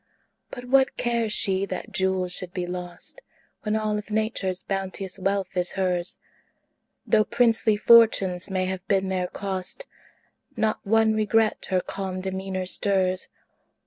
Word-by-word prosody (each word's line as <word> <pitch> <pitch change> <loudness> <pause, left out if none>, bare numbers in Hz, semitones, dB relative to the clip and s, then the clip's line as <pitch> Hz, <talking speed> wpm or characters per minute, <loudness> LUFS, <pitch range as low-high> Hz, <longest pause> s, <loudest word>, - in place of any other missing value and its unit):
But 245 -1 -8
what 265 +1 +3
cares 235 -2 0
she 195 -2 +2
that 190 +4 -5
jewels 190 -2 0
should 185 -1 -7
be 180 -1 -1
lost, 180 - -5 0.4
When 215 0 -1
all 215 -1 0
of 210 - -10
Nature's 210 -4 -1
bounteous 195 -1 -4
wealth 195 0 -1
is 180 -1 +1
hers? 180 -2 -1 0.9
Though 215 -1 +4
princely 225 -2 +2
fortunes 205 -5 +5
may 185 -1 0
have 185 -1 -4
been 195 -2 +1
their 185 -1 -1
cost, 190 - -4 0.7
Not 220 -1 +1
one 220 +1 +3
regret 215 0 +1
her 185 -2 +2
calm 190 -1 -5
demeanor 190 0 -3
stirs. 185 -1 +1
195 Hz, 140 wpm, -25 LUFS, 185-215 Hz, 0.9 s, fortunes